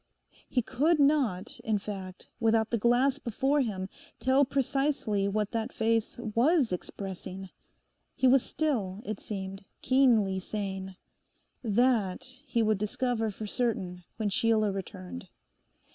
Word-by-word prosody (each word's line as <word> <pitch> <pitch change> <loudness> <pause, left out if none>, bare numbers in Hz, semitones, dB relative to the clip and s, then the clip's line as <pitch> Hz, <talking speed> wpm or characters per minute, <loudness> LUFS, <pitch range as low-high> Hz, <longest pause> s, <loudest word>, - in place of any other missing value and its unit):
He 250 - +1
could 295 +8 +2
not, 275 -10 +2
in 220 -2 0
fact, 195 -2 -7
without 225 -1 +2
the 235 - +2
glass 250 +5 +3
before 270 +3 +1
him, 195 -6 -2 0.3
tell 265 +2 +4
precisely 270 -6 0
what 210 +1 -1
that 225 -2 -2
face 225 0 0
was 240 - +2
expressing. 190 +1 -6 0.6
He 260 - +3
was 260 +1 +6
still, 225 -12 -1
it 215 -2 -4
seemed, 195 -1 -6 0.2
keenly 230 -8 +4
sane. 190 -1 -4 0.7
That 225 -4 +2 0.2
he 235 -2 +1
would 215 -2 +2
discover 225 +1 0
for 215 +1 -6
certain 195 -6 -2
when 215 -2 0
Sheila 220 -1 +2
returned. 90 - -7
220 Hz, 125 wpm, -29 LUFS, 195-255 Hz, 0.7 s, was